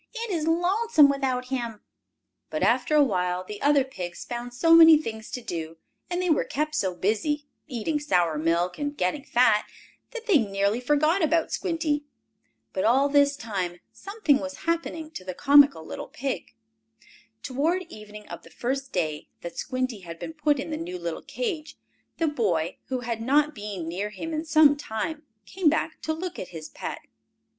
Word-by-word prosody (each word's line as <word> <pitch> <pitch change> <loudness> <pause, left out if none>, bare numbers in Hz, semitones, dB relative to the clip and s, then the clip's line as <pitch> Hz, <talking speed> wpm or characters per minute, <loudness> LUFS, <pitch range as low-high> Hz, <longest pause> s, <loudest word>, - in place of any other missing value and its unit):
"It 460 -2 -3
is 325 -3 -1
lonesome 350 -1 +4
without 260 -2 -1
him." 235 -5 -3 0.7
But, - - -2
after 305 - +2
a 295 - +7
while, 180 -6 0
the 205 +2 -8
other 285 -1 +4
pigs 180 -9 -7
found 240 0 -5
so 330 +7 +3
many 325 -1 +10
things 220 -7 -6
to 250 - -5
do, 165 -7 -5 0.3
and 350 0 -1
they 365 -1 0
were 310 - +3
kept 305 +2 -2
so 190 -11 0
busy, 225 - 0 0.2
eating 285 +3 -2
sour 175 - +1
milk, 170 +3 0
and 290 0 -3
getting 185 +11 -1
fat, 230 -5 +3 0.4
that 475 -2 -8
they 385 -10 +5
nearly 200 0 0
forgot 300 +7 +2
about 320 +1 +2
Squinty. 325 -5 -1 0.7
But, 190 - -1
all 265 +5 +4
this 285 0 +4
time, 190 -10 -4
something 395 -9 +1
was 280 0 -7
happening 330 -1 -2
to 190 - -8
the 185 -1 -6
comical 280 - +5
little - - -6
pig. 260 - -5 0.9
Toward 315 +8 0
evening 210 - -12
of - - -8
the - - -16
first 270 +2 -3
day 155 -4 -2
that 170 -1 -7
Squinty 255 -4 -2
had 170 -3 -9
been 320 - -7
put 300 -2 +1
in 295 - -4
the 305 - -2
new 350 +3 -5
little - - -4
cage, 340 -11 -4 0.4
the 330 - +1
boy, 190 - 0
who 255 -1 -2
had 230 -1 -3
not 290 +5 +3
been 205 - -6
near 190 +5 -3
him 320 +9 -6
in 310 +1 -2
some 310 -2 +6
time, 290 +4 -4 0.2
came 355 - +2
back 315 +1 -1
to 315 - -2
look 350 +3 -4
at 185 - -5
his 155 -2 -9
pet. - - -6
275 Hz, 180 wpm, -26 LUFS, 210-315 Hz, 0.9 s, many